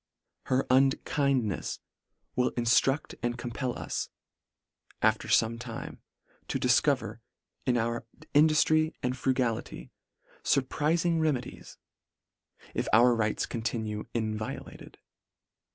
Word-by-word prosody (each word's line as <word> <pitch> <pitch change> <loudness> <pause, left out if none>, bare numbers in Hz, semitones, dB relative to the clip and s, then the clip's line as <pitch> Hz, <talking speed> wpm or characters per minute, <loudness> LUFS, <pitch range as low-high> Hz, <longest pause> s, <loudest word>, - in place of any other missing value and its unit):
Her 130 +1 +2
unkindnefs 135 -4 +1 0.6
will 125 - +2
inftruct 125 +4 +2
and 120 0 -1
compel 120 +1 -3
us, - - -3 0.9
af 110 0 +4
ter - - -9
fome 115 +1 +2
time, 120 -1 -7 0.5
to - - -1
difcover, - - +2 0.5
in 125 -1 +3
our 115 0 -2 0.3
induftry 155 +1 +4
and 125 0 0
frugality, 125 -3 -1 0.5
furpriling 160 +5 +1
remedies 145 -6 -2 0.5
— - - -27
if - - -2
our 120 +2 +6
rights 110 -2 0
continue 110 -2 -3
inviolated. 110 -1 -4
125 Hz, 100 wpm, -29 LUFS, 115-135 Hz, 0.9 s, our